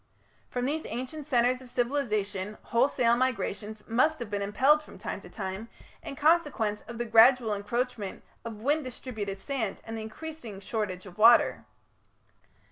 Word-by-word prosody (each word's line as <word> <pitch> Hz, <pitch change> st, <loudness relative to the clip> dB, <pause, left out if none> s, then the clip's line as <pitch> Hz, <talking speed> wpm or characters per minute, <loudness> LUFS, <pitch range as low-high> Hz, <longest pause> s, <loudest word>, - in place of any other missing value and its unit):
From 245 Hz, 0 st, -2 dB
these 310 Hz, +4 st, -2 dB
ancient 260 Hz, +6 st, -5 dB
centres 250 Hz, -1 st, +2 dB
of 255 Hz, -, -13 dB
civilization 215 Hz, -6 st, -1 dB
wholesale 235 Hz, -1 st, +3 dB
migrations 220 Hz, -3 st, -2 dB
must 280 Hz, +8 st, +3 dB
have 235 Hz, -4 st, -7 dB
been 205 Hz, -1 st, -1 dB
impelled 265 Hz, +10 st, +4 dB
from -, -, -14 dB
time -, -, -5 dB
to -, -, -12 dB
time 195 Hz, +2 st, -5 dB, 0.3 s
in -, -, -7 dB
consequence 290 Hz, -9 st, +2 dB
of 235 Hz, 0 st, -7 dB
the 240 Hz, -, -2 dB
gradual 230 Hz, 0 st, +6 dB
encroachment 210 Hz, 0 st, -3 dB, 0.2 s
of 225 Hz, -2 st, -7 dB
wind 295 Hz, +4 st, +2 dB
distributed 220 Hz, -6 st, -5 dB
sand 225 Hz, -1 st, -3 dB
and 225 Hz, -, -5 dB
the 220 Hz, -, -4 dB
increasing 225 Hz, -2 st, -8 dB
shortage 195 Hz, -3 st, -3 dB
of 190 Hz, +2 st, -13 dB
water. 235 Hz, +2 st, +6 dB
235 Hz, 150 wpm, -29 LUFS, 210-260 Hz, 0.3 s, gradual